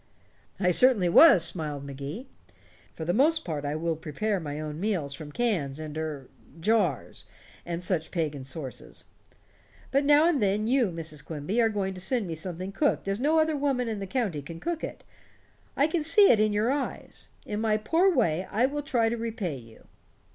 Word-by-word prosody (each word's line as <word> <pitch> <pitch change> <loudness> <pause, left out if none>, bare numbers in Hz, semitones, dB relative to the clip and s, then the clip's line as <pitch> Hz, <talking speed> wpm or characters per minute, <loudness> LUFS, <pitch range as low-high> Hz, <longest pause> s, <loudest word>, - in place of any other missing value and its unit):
"I 180 -2 +3
certainly 210 -3 +4
was," 190 - +8
smiled 155 -5 -2
Mr. - - -9
Magee. 140 - -7 0.7
"For 160 - -5
the 175 - 0
most 315 - +2
part 150 -4 -3
I 145 +1 -2
will 165 +1 -1
prepare 185 +7 -2
my 150 -2 -5
own 155 0 -5
meals 180 -9 -1
from 150 +1 -8
cans 160 - -1
and 155 -1 -7
er 155 -4 -4 0.3
jars 190 - 0 0.4
and 170 0 -3
such 175 -3 -1
pagan 150 -6 -3
sources. 135 0 -6 0.9
But 275 +1 +2
now 295 +3 +5
and 330 -6 +1
then 205 +1 +1
you, 250 0 +3
Mrs. 160 -3 -6
Quimby, 160 +10 -2
are 225 - +3
going 195 -3 -2
to 185 - -8
send 235 +3 0
me 170 - -4
something 180 +3 -5
cooked 290 0 0
as 195 +2 -1
no 300 +5 +2
other 315 0 +2
woman 275 -4 0
in 220 -2 -3
the 195 - -5
county 205 - -2
can 165 +4 -9
cook 340 - -3
it. - - -6 0.7
I 285 - +4
can 320 +1 0
see 330 +7 +6
it 220 - +4
in 215 0 +3
your 210 +4 +1
eyes. 280 -1 -4 0.2
In 210 +1 -3
my 215 -1 +2
poor 330 - +2
way 185 - +1
I 230 +5 +2
shall 290 +2 -3
try 240 -5 +1
to 235 +1 -1
repay 225 - -3
you." 115 -2 -16
195 Hz, 195 wpm, -27 LUFS, 155-245 Hz, 0.9 s, was